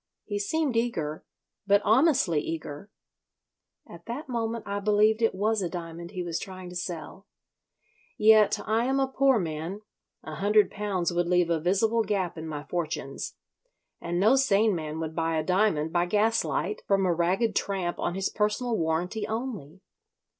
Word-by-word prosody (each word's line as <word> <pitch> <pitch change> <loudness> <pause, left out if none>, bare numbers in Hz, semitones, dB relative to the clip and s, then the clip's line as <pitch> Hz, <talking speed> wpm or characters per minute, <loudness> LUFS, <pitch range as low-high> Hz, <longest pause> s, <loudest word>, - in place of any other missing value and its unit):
He 205 -1 -3
seemed 280 +5 0
eager, 165 -11 -1 0.4
but 200 0 +5
honestly 255 - +4
eager. 160 +3 -6 1.0
At 170 +3 -13
that 265 +7 -5
moment 230 -2 -2
I 200 0 -3
believed 210 +2 +3
it 225 -4 +2
was 215 +2 +1
a 180 - -2
diamond 170 -1 -7
he 185 -2 -4
was 170 -2 -3
trying 185 -1 -8
to 180 - -10
sell. 180 +2 -6 0.9
Yet 215 -1 +5
I 225 +2 +1
am 270 +1 +1
a 270 - +2
poor 265 -1 +3
man, 165 +2 -4 0.4
a - - -7
hundred 210 +1 +3
pounds 195 -4 -2
would 175 0 0
leave 180 -1 +2
a 165 - +2
visible 220 +6 +2
gap 195 -4 -1
in 160 -1 -7
my 150 -2 -5
fortunes 155 -3 -4 0.7
and 175 +1 -2
no 220 +7 +5
sane 220 -5 +3
man 155 -2 -4
would 160 0 -4
buy 165 -1 0
a 155 - 0
diamond 180 -3 +1
by 175 0 +2
gaslight 210 0 0
from 195 -1 +2
a 180 - +2
ragged 190 +6 +1
tramp 185 -3 -1
on 175 - -1
his 195 0 0
personal 215 +3 0
warranty 180 +5 -1
only. 215 - -5
195 Hz, 165 wpm, -27 LUFS, 170-220 Hz, 1.0 s, but